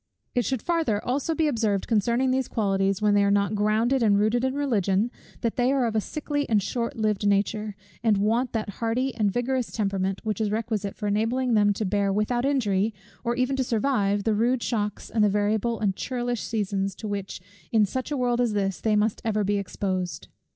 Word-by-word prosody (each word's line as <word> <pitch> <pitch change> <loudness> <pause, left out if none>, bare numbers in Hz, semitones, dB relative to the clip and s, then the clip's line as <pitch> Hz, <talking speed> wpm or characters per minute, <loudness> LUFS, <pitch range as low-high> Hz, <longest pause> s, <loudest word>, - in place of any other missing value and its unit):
It 245 -2 +1
should 260 -4 -2
farther 325 -12 +1
also 280 +6 0
be 315 0 +2
observed 220 -7 0
concerning 235 +4 +2
these 260 -1 0
qualities, 195 -2 0
when 210 -1 +4
they 205 0 +4
are 200 - +3
not 200 +1 +2
grounded 215 +5 +2
and 205 -3 +4
rooted 215 +4 +2
in 260 +1 0
religion, 225 -6 +1 0.3
that 230 -2 -1
they 250 +1 +3
are 270 -3 +2
of 225 -1 -2
a 215 - +3
sickly 290 +3 -3
and 215 -2 +4
short 235 +4 -3
lived 210 -2 0
nature, 205 +1 0 0.3
and 220 -3 +3
want 225 +5 +1
that 220 -2 -2
hardy 245 +3 0
and 210 -3 +1
vigorous 245 +2 -1
temperament, 195 -3 -1
which 220 +1 -2
is 215 - +1
requisite 215 -2 -2
for 210 - -6
enabling 230 +5 +1
them 205 -1 +4
to 210 +2 -3
bear 200 +1 +1
without 225 +5 0
injury, 220 -7 +1 0.3
or 240 0 0
even 255 +2 +1
to 265 - +2
survive, 210 -4 +1
the 220 - +1
rude 235 +3 +1
shocks 210 -3 -2
and 220 -2 +2
the 210 - +5
variable 210 +3 0
and 200 -3 0
churlish 245 -1 -2
seasons, 195 -3 -2
to 220 - -7
which 200 -2 -4 0.3
in 220 -2 +4
such 255 +5 -4
a 295 - -2
world 245 -1 +1
as 235 -3 +1
this 195 -2 -1
they 220 -1 +2
must 210 +1 +1
ever 215 -2 0
be 200 +1 +1
exposed. 185 -4 -3
220 Hz, 205 wpm, -26 LUFS, 205-245 Hz, 0.3 s, the